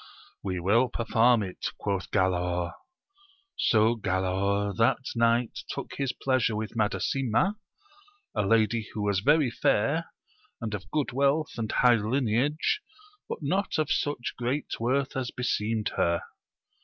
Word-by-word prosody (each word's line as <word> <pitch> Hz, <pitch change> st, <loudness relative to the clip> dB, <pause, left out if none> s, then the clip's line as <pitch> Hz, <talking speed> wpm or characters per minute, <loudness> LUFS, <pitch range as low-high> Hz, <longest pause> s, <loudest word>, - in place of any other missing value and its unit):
We 95 Hz, -2 st, -3 dB
will 110 Hz, +8 st, +3 dB
perform 115 Hz, 0 st, +3 dB
it! 95 Hz, -2 st, -5 dB
quoth 100 Hz, -2 st, -2 dB
Galaor. 90 Hz, -1 st, 0 dB, 0.8 s
So 110 Hz, +1 st, +3 dB
Galaor 100 Hz, 0 st, 0 dB
that 115 Hz, +4 st, +4 dB, 0.2 s
night 115 Hz, 0 st, +2 dB
took -, -, -5 dB
his 135 Hz, -2 st, 0 dB
pleasure 130 Hz, -4 st, 0 dB
with 110 Hz, +1 st, -4 dB
Madasima, 120 Hz, -, +1 dB, 0.8 s
a 105 Hz, -, +1 dB
lady 110 Hz, +2 st, +2 dB
who 105 Hz, -, -2 dB
was 100 Hz, -2 st, +1 dB
very 145 Hz, +3 st, +3 dB
fair, -, -, +1 dB, 0.5 s
and 110 Hz, -2 st, -4 dB
of 95 Hz, -2 st, -6 dB
good 150 Hz, -4 st, -1 dB
wealth 140 Hz, +4 st, +1 dB
and. 115 Hz, -3 st, -3 dB
high 125 Hz, -1 st, +5 dB
lineage, 125 Hz, -, 0 dB, 0.5 s
but -, -, -5 dB
not 190 Hz, +8 st, 0 dB
of 155 Hz, -2 st, 0 dB
such 145 Hz, -5 st, -1 dB
great 130 Hz, +5 st, -2 dB
worth 130 Hz, +4 st, 0 dB
as 130 Hz, -2 st, -2 dB
beseemed 110 Hz, -3 st, -1 dB
her. 85 Hz, 0 st, +1 dB
115 Hz, 130 wpm, -28 LUFS, 100-130 Hz, 0.8 s, high